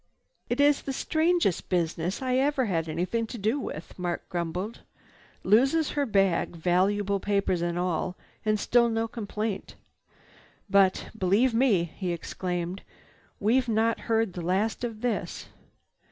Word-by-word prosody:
"It's 285 +3 +3
the 270 - -4
strangest 315 - +1
business 175 +4 -1
I 255 0 +1
ever 275 -1 +2
had 165 -6 -1
anything 185 +8 -1
to 240 - -7
do 220 +7 0
with!" 165 - -7
Mark 175 -1 -3
grumbled. 180 +5 -3 0.6
"Loses 270 +10 +3
her 285 -2 0
bag, 195 -5 +2
valuable 195 +4 +1
papers 195 -3 0
and 170 0 -1
all, 180 0 -1 0.3
and 215 -1 +1
still 235 +2 +3
no 225 0 0
complaint. 215 -2 -4 0.9
But 195 -2 +3
believe 220 +5 +2
me!" 225 -7 +3
he 175 +2 -4
exclaimed, 175 +2 -4 0.6
"we've 245 +5 +2
not 225 +1 +2
heard 225 -4 +2
the 175 - -5
last 195 +8 0
of 225 -3 -4
this!" 245 -2 -3
205 Hz, 135 wpm, -27 LUFS, 180-235 Hz, 0.9 s, It's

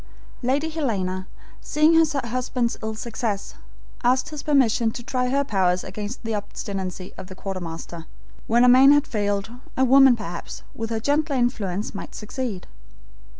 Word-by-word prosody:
Lady 275 +5 +1
Helena, 195 - -2 0.3
seeing 305 +2 +3
her 325 0 +6 0.2
husband's 245 0 -1
ill 220 0 -3
success, 220 -2 -3 0.5
asked 255 +4 +2
his 300 -2 -6
permission 250 -6 +3
to 240 +2 -7
try 250 0 -1
her 280 +2 +2
powers 185 -7 +1
against 210 +6 -6
the 225 -1 -2
obstinacy 195 -3 -5
of - - -8
the 185 - -10
quartermaster. 170 -3 -6 0.4
When 235 +2 +4
a - - +6
man 260 +3 +8
had 290 0 +3
failed, 205 -2 -1 0.3
a 260 - +4
woman 265 0 +7
perhaps, 175 -6 -7
with 225 0 -4
her 225 -1 -1
gentler 290 +4 +1
influence, 215 -6 -1
might 200 - -7
succeed. 215 -3 -5
230 Hz, 150 wpm, -24 LUFS, 200-260 Hz, 0.5 s, man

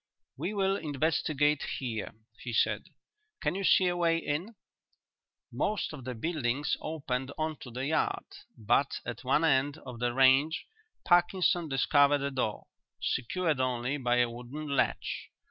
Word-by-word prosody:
"We 175 +10 -3
will 195 0 +2
investigate 150 -1 +1 0.2
here," 115 -6 -4 0.2
he 120 - -6
said. - - +1 0.5
"Can 150 -3 0
you 195 +2 -3
see 185 - +5
a 175 0 +1
way 170 -1 +2
in?" 165 +8 -3 1.0
Most 210 -6 -1
of 135 -5 -9
the 130 -1 -4
buildings 145 0 -1
opened 135 -4 -3
on 155 -1 -2
to 125 - -9
the 125 +3 -4
yard, 155 +2 0 0.3
but 115 +6 +1
at 115 +1 -6
one 135 +5 +2
end 145 0 +2
of 125 -2 -8
the 120 0 +1
range 135 +5 +4 0.4
Parkinson 175 -1 +3
discovered 145 +1 +4
a 140 - -1
door, 125 -5 -2 0.3
secured 155 +4 0
only 130 +2 0
by 120 -3 +1
a 125 0 +4
wooden 125 +6 -7
latch. - - -1
145 Hz, 145 wpm, -30 LUFS, 125-160 Hz, 1.0 s, see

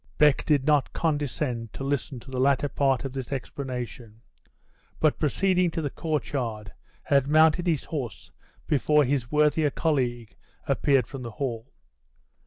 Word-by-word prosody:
Beck 150 -2 +4
did 145 -3 +2
not 150 -2 +2
condescend 145 -7 -2
to - - -6
listen 140 -1 -2
to 130 +3 -13
the 130 - -3
latter 140 +2 +3
part 135 -2 +1
of 135 - -4
this 130 -2 -5
explanation; 125 -4 -6 0.8
but 155 -2 +2
proceeding 180 +4 +2
to 165 - -3
the 145 - -2
court 155 -3 -3
yard, 110 -6 -3 0.3
had 140 -1 +2
mounted 160 +3 +4
his 160 -5 +1
horse 135 -7 -6 0.3
before 150 +1 +3
his 130 -2 -1
worthier 150 0 +3
colleague 120 - -1 0.3
appeared 135 -4 +2
from 135 +2 -8
the 120 - -5
hall. 115 0 -4
140 Hz, 150 wpm, -26 LUFS, 125-150 Hz, 0.8 s, Beck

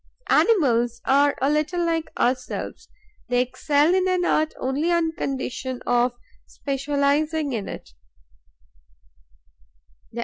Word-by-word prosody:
Animals 240 - +3
are 285 +1 +3
a 275 - +3
little 310 +4 0
like 330 -1 -1
ourselves: 250 +1 -2 0.4
they 245 0 +2
excel 290 +5 +2
in 375 0 +2
an 365 -1 +1
art 310 -2 +1
only 280 +6 -1
on 335 -2 +1
condition 260 -4 -4
of 245 0 +2 0.3
specializing 285 +2 -1
in 205 -4 -3
it. - - -9
285 Hz, 105 wpm, -23 LUFS, 255-320 Hz, 0.4 s, Animals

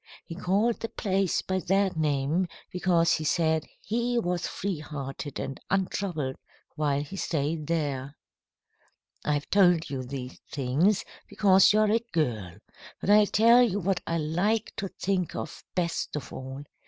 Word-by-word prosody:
He - - -7
called 200 +6 +1
the 225 - -4
place 195 -2 0
by 190 0 -1
that 195 0 +2
name 155 +3 +1 0.2
because 175 -2 +2
he 155 - -1
said 160 0 +1 0.2
he 240 +2 0
was 180 -6 0
free 190 -5 -3
hearted 145 -1 -6
and 135 - -5
untroubled 180 -7 -1 0.4
while 145 -2 0
he 150 +7 -9
stayed 155 -3 -2
there. 145 -4 -2 1.1
"I've 145 -1 0
told 175 -6 +4
you 135 -2 -2
these 130 0 -7
things 150 +10 +1 0.2
because 190 -2 +5
you 215 +1 +4
are 215 -1 +3
a 225 - +4
girl. 110 - -1 0.4
But 200 - +1
I'll 210 0 +7
tell 230 +4 +6
you 210 -5 +2
what 190 -1 0
I 165 - 0
like 180 +8 0
to 195 - -2
think 185 -2 -2
of - - -6
best 170 -4 -1
of 150 - -6
all. 135 +2 -7
170 Hz, 155 wpm, -27 LUFS, 145-195 Hz, 1.1 s, I'll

